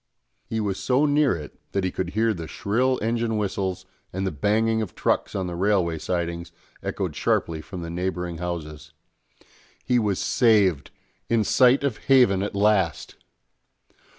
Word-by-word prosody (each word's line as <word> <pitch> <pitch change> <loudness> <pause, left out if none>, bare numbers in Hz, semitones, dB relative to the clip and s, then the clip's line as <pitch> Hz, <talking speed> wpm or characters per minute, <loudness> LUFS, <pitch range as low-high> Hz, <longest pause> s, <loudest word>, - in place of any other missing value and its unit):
He 110 - -1
was 100 -3 -2
so 130 +3 +2
near 145 -5 +3
it 75 -3 -9
that 100 - 0
he 95 - 0
could 90 -1 -3
hear 115 0 +3
the 85 -4 -7
shrill 125 +9 0
engine 115 0 0
whistles, 95 -2 -2 0.3
and 95 +1 -3
the 95 - -1
banging 110 +8 +1
of 110 - -5
trucks - - 0
on 95 - -1
the 90 - -4
railway 90 -3 +1
sidings 85 -1 -3 0.3
echoed - - -3
sharply 80 -2 0
from 90 +1 -8
the 85 - -6
neighbouring 90 -1 -3
houses. 75 -3 -6 0.9
He 125 -1 +3
was 105 -4 0
saved, 100 - +3 0.4
in 115 -2 +3
sight 125 +5 +4
of 135 -6 0
haven 125 -8 +4
at 100 0 -3
last! 100 -4 +1
100 Hz, 155 wpm, -24 LUFS, 85-115 Hz, 0.9 s, sight